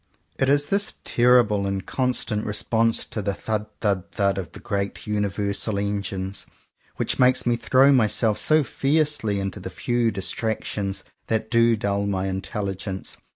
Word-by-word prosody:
It 135 - +2
is 145 +1 +4
this 200 +6 0
terrible 120 -5 +3
and 95 -2 -3
constant 125 -4 -1
response 115 +2 0
to 110 - -4
the 100 0 -2
"thud 105 +1 -3
thud 100 -4 -1
thud 100 -2 +1
"of 95 - -6
the - - -10
great 100 -1 -3
universal 105 0 -1
Engines, 100 -1 -3 0.5
which - - -1
makes 125 0 +4
me 120 -1 +2
throw 130 +3 +4
myself 110 -3 +3
so 155 +4 +4
fiercely 140 -8 0
into 95 +1 -4
the 95 - -6
few 120 +4 0
distractions 100 -1 -2 0.2
that 110 0 -1
do 115 0 +4
dull 100 -1 -1
my 95 -1 -1
intelligence. 95 0 -4
105 Hz, 150 wpm, -24 LUFS, 100-120 Hz, 0.5 s, is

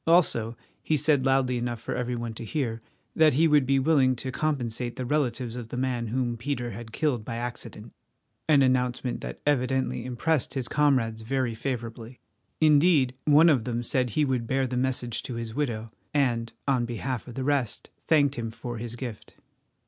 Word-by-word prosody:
Also, 120 -10 +3 0.2
he 155 - +1
said 140 -3 +2
loudly 130 -2 +2
enough 120 -1 -3
for - - -4
every 125 0 -2
one 120 -1 -4
to 110 - -8
hear, 115 -2 -2 0.3
that 155 -4 +5
he 165 +3 +5
would 150 -4 +4
be 135 0 +3
willing 135 -2 +3
to 130 +2 -4
compensate 125 -5 -2
the 130 - -4
relatives 125 -4 -1
of 120 -2 -6
the 125 - -6
man 125 -2 -1
whom 120 0 -1
Peter 120 -1 -3
had 110 +2 -8
killed 130 -3 0
by 115 +2 -5
accident—an 125 +4 -3
announcement 125 -1 0
that - - -6
evidently 130 -3 +1
impressed 130 +5 -1
his 130 -3 -1
comrades 130 -7 +2
very 130 +1 -1
favourably. 120 -1 -5 0.4
Indeed 150 -3 +5
one 150 +3 +6
of 140 -8 +4
them 120 0 -2
said 125 +1 0
he 150 +7 +1
would 125 -4 -1
bear 135 +1 +1
the 125 0 -3
message 125 -2 -1
to 125 - -6
his 115 -1 -5
widow, 115 -5 -2 0.2
and, 120 -5 +1 0.2
on 130 -3 +2
behalf 120 0 -4
of 120 - -9
the 130 - -2
rest, 135 -6 -1 0.2
thanked 145 -3 +4
him 115 -4 -4
for 120 +1 -6
his 120 0 -5
gift. 120 -4 -7
125 Hz, 180 wpm, -27 LUFS, 120-140 Hz, 0.4 s, one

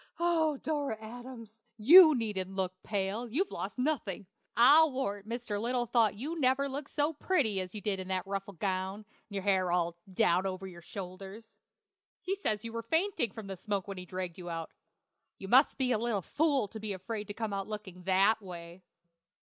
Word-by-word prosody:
"Oh, 325 -4 +2
Dora 285 -6 -2
Adams! 230 -1 -10 0.2
you 310 - +9
needn't 195 -5 -3
look 185 -1 -1
pale; 205 +3 -2
you've 355 - 0
lost 195 +4 -5
nothing. 250 - -1 0.3
I'll 295 +6 +7
warrant 210 -6 -3
Mr. 230 -3 -3
Little 240 +1 0
thought 225 -3 +2
you 305 +10 -4
never 265 +1 +2
looked 280 +1 -5
so 295 +2 0
pretty 275 - +1
as 185 +2 -7
in 195 -2 -3
that 190 0 -2
ruffled 195 -1 -5
gown, 190 +2 -2 0.3
and 200 - -8
your 195 - -2
hair 190 -3 +2
all 170 -1 +1 0.2
down 185 -2 +2
over 190 0 -5
your 175 -2 -10
shoulders. 195 +5 -9 0.6
He 370 +1 -1
says 220 - -1
you 230 - -6
were 230 - -3
fainting 320 - 0
from 220 +1 -8
the 195 -1 -5
smoke 200 0 -3
when 195 -2 -6
he 180 - -9
dragged 185 -1 -5
you 175 -1 -7
out. 165 -1 -5 0.7
You 195 - -8
must 260 +7 +5
be 260 -2 +1
a 225 - +2
little 225 -5 -1
fool 285 - +1
to 220 - -8
be 215 -1 -3
afraid 210 +3 -5
to 205 - -6
come 220 -3 -3
out 195 -1 -3
looking 205 -4 -7
that 195 +4 +3
way. 175 -1 -9
210 Hz, 190 wpm, -31 LUFS, 190-255 Hz, 0.7 s, you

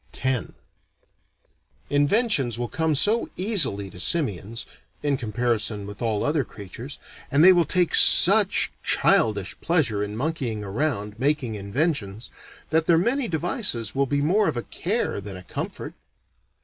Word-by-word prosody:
X 130 -2 -1 1.4
Inventions 145 - +1
will 120 0 -3
come 160 +2 -1
so 215 - +1
easily 175 - +1
to 90 - -11
simians 115 - -1 0.4
(in 145 -1 +1
comparison 115 -3 -1
with 105 0 -10
all 110 -3 -1
other 145 -1 +1
creatures) 110 +7 -10 0.3
and 145 +3 +3
they 185 +1 +8
will 175 -2 +2
take 180 +3 0
such - - +6
childish 100 -4 +1
pleasure 125 -12 +1
in 105 +1 -6
monkeying 125 -7 -3
around, 105 -1 -3
making 135 -3 0
inventions, 105 - -3 0.4
that 160 0 +1
their 170 - +4
many 240 +8 0
devices 160 - -1
will 140 0 0
be 145 +1 -1
more 195 +7 +2
of - - -2
a 120 - -3
care 200 - -3
than 100 -1 -8
a 90 - -12
comfort. - - -6
135 Hz, 140 wpm, -24 LUFS, 105-165 Hz, 1.4 s, they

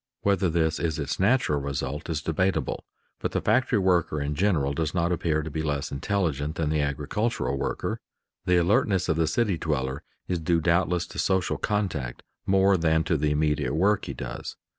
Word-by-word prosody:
Whether 100 -2 +2
this 80 -1 +1
is 80 -3 -1
its 75 0 -3
natural 95 - +2
result 70 +3 -4
is 75 -2 -2
debatable, 95 +4 -1 0.3
but - - -3
the - - +1
factory 125 -2 +2
worker 90 -5 +2
in 70 +1 -2
general 75 -5 +1
does 80 +2 -2
not 85 0 +1
appear 80 -3 0
to 80 - -6
be 80 - -2
less 75 -2 -2
intelligent 75 -2 -1
than 75 -2 -1
the 75 -1 +1
agricultural 70 - -1
worker. - - -2 0.5
The 90 -1 +4
alertness 95 0 +2
of 80 - +3
the 80 0 +1
city 100 -1 +1
dweller 70 -3 -2 0.3
is 90 - -1
due 85 +1 +1
doubtless 85 +1 +1
to - - -8
social 95 -2 +1
contact 85 - -2 0.2
more 95 0 +4
than 80 -1 +2
to 80 - 0
the 75 +2 +1
immediate 75 -1 0
work 100 +5 +2
he - - -5
does. - - -6
80 Hz, 185 wpm, -26 LUFS, 75-95 Hz, 0.5 s, The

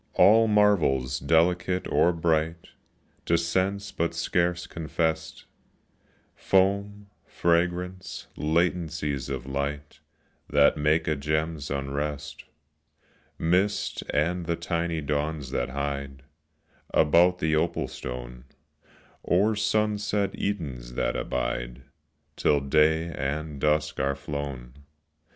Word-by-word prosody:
All 115 +3 +6
marvels 85 -12 +3
delicate 85 +4 +2
or 85 - +3
bright 80 0 -1 0.6
To 85 - +4
sense 95 +4 -1
but 85 -3 -2
scarce 90 +1 0
confest: 80 0 -3 0.9
Foam, 100 +1 +1
fragrance, 90 +2 -1
latencies 80 -4 -1
of 65 -1 -4
light 70 +2 -4 0.5
That 70 0 +5
make 75 +2 +1
a 80 - +2
gem's 75 +1 -2
unrest; 70 +2 -4 0.9
Mist, 90 +5 +1
and 85 +4 0
the 85 - +1
tiny 85 -1 -2
dawns 75 -1 -2
that 65 -2 -1
hide 70 0 -4 0.7
About 85 +4 +4
the 80 -3 +1
opal 80 +2 0
stone, 60 0 -7 0.8
Or 105 +5 +2
sunset 105 -1 0
Edens 65 -12 -4
that - - 0
abide - - -3 0.5
Till 75 - +2
day 80 +4 +2
and 75 +1 -4
dusk 75 0 +1
are 70 0 +1
flown. 70 -3 -6
80 Hz, 100 wpm, -26 LUFS, 70-90 Hz, 0.9 s, All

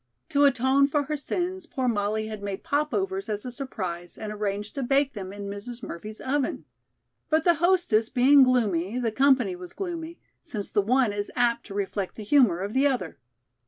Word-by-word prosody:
To 285 0 +4
atone 270 +1 +4
for 290 0 +1
her 300 +2 -3
sins, 360 +5 -3
poor 260 -2 -2
Molly 215 -1 0
had 215 -1 -6
made 200 -1 -5
popovers 330 +6 -1
as 210 +1 -3
a 250 - -4
surprise 185 -10 -5
and 215 -1 -5
arranged 205 0 -3
to 275 - -3
bake 275 +2 +2
them 190 -4 -6
in 205 0 -8
Mrs. 205 +5 -7
Murphy's 210 +6 -7
oven. 270 0 -1 0.6
But 315 0 +3
the 345 - +5
hostess 345 - +3
being 275 +2 +6
gloomy, 220 -6 +2
the 235 -3 0
company 260 -6 +3
was 180 0 -10
gloomy, 340 -3 -5 0.2
since 205 -4 -6
the 205 - +3
one 240 +1 +2
is 205 0 -3
apt 235 -1 +1
to 200 - -8
reflect 200 -1 -3
the 215 - -7
humor 210 -7 +4
of 200 +2 -4
the 270 +2 +4
other. 245 - -2
245 Hz, 190 wpm, -26 LUFS, 205-280 Hz, 0.6 s, being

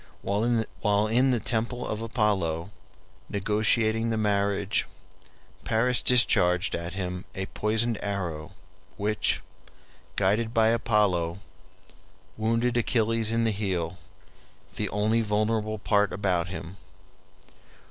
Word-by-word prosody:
While 105 -1 0
in 125 +4 +3
the 125 -2 +2
temple 115 +2 -2
of 110 0 -3
Apollo, 100 -7 0 0.6
negotiating 110 +3 +1
the 110 - 0
marriage, 100 -1 0 0.8
Paris 120 +3 +1
discharged 90 -8 +4
at 85 +1 -4
him 90 -2 -4
a 95 - -3
poisoned 110 +3 0
arrow, 90 -5 -4 0.4
which, 105 +1 0 0.7
guided 110 +4 +1
by 110 -1 +5
Apollo, 100 -7 +1 1.0
wounded 115 +2 0
Achilles 115 -1 +1
in 115 0 +1
the 115 - +2
heel, 95 -4 -2 0.8
the - - -2
only 110 +3 +1
vulnerable 110 0 0
part 105 -1 +2
about 90 -3 0
him. 90 0 -7
105 Hz, 105 wpm, -27 LUFS, 95-115 Hz, 1.0 s, by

